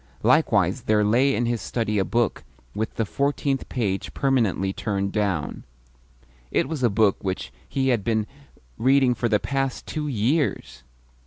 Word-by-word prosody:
Likewise - - +3
there 105 -1 +3
lay 125 +6 +3
in 120 - 0
his 115 -1 -1
study 105 -3 -1
a - - +3
book 115 +2 0 0.3
with 110 +1 -3
the 115 - 0
fourteenth 140 +3 -1
page 100 -6 -2
permanently 110 -8 +1
turned 100 -2 -2
down. 100 -8 -2 0.9
It - - +1
was 155 -2 -4
a 120 - +4
book 105 -1 +2
which 95 -1 -3 0.2
he 135 -1 0
had 120 -5 +1
been 110 -1 0 0.5
reading 130 +1 +4
for 120 -1 -1
the 105 -1 +3
past 135 +1 -2
two 150 -1 -4
years! 135 - -1
115 Hz, 155 wpm, -24 LUFS, 105-135 Hz, 0.9 s, a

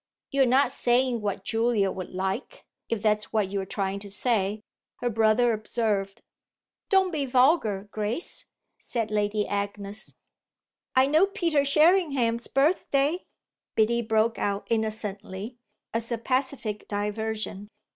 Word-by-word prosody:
"You're 275 -2 +3
not 265 +3 +4
saying 245 -1 +2
what 200 -2 -3
Julia 225 -3 +1
would 185 -2 -6
like, 190 +6 -4 0.2
if 225 -3 -2
that's 210 -1 +1
what 210 -4 0
you 200 -1 -1
are 190 - -7
trying 195 0 -2
to 200 0 -10
say," 210 -1 0 0.3
her 245 - -2
brother 225 +2 +3
observed. 210 -3 -2 0.7
"Don't 380 -1 +4
be 290 -4 -1
vulgar, 250 - +3
Grace," 215 +10 -3 0.3
said 230 -3 -3
Lady 210 0 0
Agnes. 200 +1 -4 0.8
"I 260 0 +6
know 310 +7 +4
Peter 340 -8 +1
Sherringham's 280 -6 +3
birthday!" 290 +2 +1 0.5
Biddy 235 +2 +3
broke 220 0 +1
out 200 0 -1
innocently, 215 0 -3 0.4
as 230 +1 -1
a 235 - 0
pacific 255 -3 -2
diversion. 210 0 -3
225 Hz, 125 wpm, -27 LUFS, 205-260 Hz, 0.8 s, I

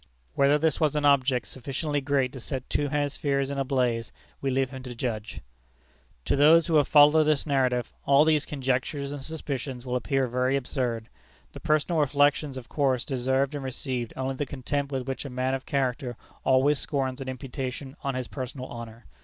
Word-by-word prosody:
Whether 140 - +4
this 160 0 +1
was 155 -3 +2
an 150 -1 +1
object 130 -4 +3
sufficiently 145 +3 -3
great 135 -2 +1
to 135 - -7
set 130 +1 -5
two 145 - +1
hemispheres 140 -1 0
in 140 - -3
a - - +2
blaze, 125 -4 0 0.3
we 135 - 0
leave 130 0 0
him 130 -1 -7
to 125 -1 -8
judge. 115 -3 -4 0.8
To - - +2
those 155 +4 +6
who 165 -3 +3
have 145 - +4
followed 150 +1 +6
this 150 -2 +2
narrative, 130 -4 +1
all 140 +2 +6
these 155 -2 +3
conjectures 140 0 -2
and 145 -1 -5
suspicions 135 -4 -5
will 125 0 -2
appear 135 +2 +1
very 125 +2 +1
absurd. 125 -4 -2 0.5
The - - -8
personal 155 +2 +1
reflections 145 0 +2
of 125 -2 -8
course 135 -4 +1
deserved 130 +1 0
and 145 -2 -4
received 130 -2 -3
only 130 +1 -1
the 140 +2 -3
contempt 140 +2 -3
with 130 -1 -3
which 135 - -3
a 140 - -6
man 130 +1 -1
of 135 -1 -4
character 130 -2 -1 0.3
always 135 +2 +3
scorns 135 -2 -2
an 130 - -4
imputation 130 +1 -5
on 140 -2 -1
his 130 -2 -3
personal 130 -1 -6
honor. 115 -2 -9
135 Hz, 185 wpm, -27 LUFS, 130-145 Hz, 0.8 s, those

